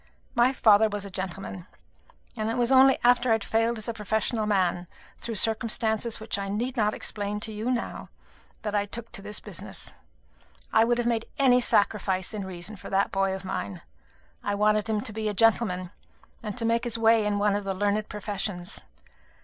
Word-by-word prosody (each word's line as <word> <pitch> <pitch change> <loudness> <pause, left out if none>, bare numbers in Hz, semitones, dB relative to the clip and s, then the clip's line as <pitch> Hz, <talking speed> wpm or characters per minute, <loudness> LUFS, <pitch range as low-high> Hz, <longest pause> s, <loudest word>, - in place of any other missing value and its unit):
My 240 +1 +4
father 220 -4 +5
was 205 -1 -4
a 200 - -8
gentleman; 185 0 -5 0.7
and 215 -1 -2
it 230 - -1
was 240 +1 +2
only 265 0 +7
after 245 0 +4
I - - +6
had 220 -2 0
failed 225 +2 +1
as 215 - -3
a 230 - -2
professional 220 +1 -1
man, 180 -3 +1 0.3
through 230 - -4
circumstances 220 +1 0
which 220 -2 -3
I 195 0 -3
need 240 +6 -2
not 215 -3 +1
explain 205 0 -3
to 220 - -2
you 215 +3 -3
now, 245 -2 -3 0.5
that 210 -1 -3
I 205 -1 +1
took 230 +2 -7
to - - -7
this 210 +1 -3
business. - - -9 0.8
I 220 +1 +6
would 240 0 +2
have 240 - 0
made 230 -1 0
any 255 -3 +5
sacrifice 200 -4 +1
in 205 -2 -4
reason 185 +3 -4
for - - -9
that 195 +1 +1
boy 195 0 +1
of 190 0 -8
mine. 100 - -4 0.6
I 205 - -1
wanted 210 +1 +2
him 215 -1 +1
to 215 - -5
be 215 0 -2
a 205 - -4
gentleman, 185 -4 +2 0.5
and 210 -1 -5
to 230 - -1
make 230 +1 +2
his 235 -2 -2
way 225 -1 +4
in 210 -1 0
one 205 0 +2
of 205 - -2
the 195 -1 -2
learned 205 +2 0
professions. 200 -3 -4
215 Hz, 200 wpm, -27 LUFS, 200-230 Hz, 0.8 s, only